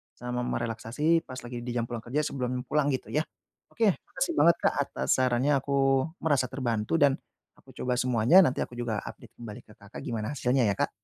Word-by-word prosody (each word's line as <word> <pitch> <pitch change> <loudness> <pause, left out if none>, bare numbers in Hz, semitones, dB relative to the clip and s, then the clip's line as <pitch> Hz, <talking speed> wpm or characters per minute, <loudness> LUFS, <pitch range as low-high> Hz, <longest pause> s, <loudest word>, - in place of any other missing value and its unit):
sama 125 0 -4
merelaksasi 145 +10 0
pas 130 0 -7
lagi 120 0 -7
di 120 - -3
jam 115 -1 0
pulang 115 -2 -5
kerja 140 +6 0
sebelum 125 -1 -2
pulang, 150 -1 +1
gitu 130 - -4
ya. 155 +1 +1 0.5
Oke, 225 -3 +3 0.2
makasih 330 +5 -2
banget, 170 -1 +6
Kak, - - +3
atas 65 +1 -5
sarannya, 130 +2 +2
aku 140 +1 -4 0.5
merasa 145 -5 +2
terbantu 120 -1 -2
dan 140 -1 +5 0.4
aku - - -21
coba 125 0 -1
semuanya, 125 +6 +4
nanti 130 - 0
aku - - -4
juga 115 -4 -2
update - - -11
kembali 115 0 -9
ke 105 - -17
Kakak 100 +1 -11
gimana 115 +1 -3
hasilnya 130 -1 +1
ya, 100 - 0
Kak. - - +1
125 Hz, 195 wpm, -28 LUFS, 120-140 Hz, 0.5 s, banget